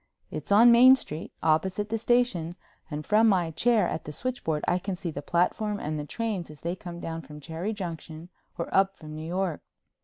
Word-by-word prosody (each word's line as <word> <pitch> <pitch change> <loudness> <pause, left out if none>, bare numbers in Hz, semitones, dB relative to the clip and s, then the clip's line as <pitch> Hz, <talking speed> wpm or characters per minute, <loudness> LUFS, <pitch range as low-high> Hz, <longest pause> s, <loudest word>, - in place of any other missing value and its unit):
It's - - -6
on 230 +4 +8
Main 255 +3 +9
Street, 160 - -6
opposite 185 +6 +1
the 225 - 0
station, 215 -9 +1 0.3
and 150 -1 -5
from 220 +2 +4
my 180 -5 +2
chair 225 +7 +2
at 160 - -4
the 150 - -6
switchboard 160 - -3
I 175 - +2
can 195 +1 -3
see 175 -2 -5
the 145 - -5
platform 205 +6 0
and 155 0 -3
the 145 - -5
trains 210 -4 -3
as 150 -1 -13
they 170 +2 -2
come 175 -2 -8
down 165 -1 -5
from 150 +1 -11
Cherry 165 +7 -4
Junction 170 -4 -7 0.3
or 170 - -3
up 195 0 +3
from 155 -1 -10
New 155 +1 -6
York. 180 -2 -2
175 Hz, 205 wpm, -27 LUFS, 160-210 Hz, 0.3 s, Main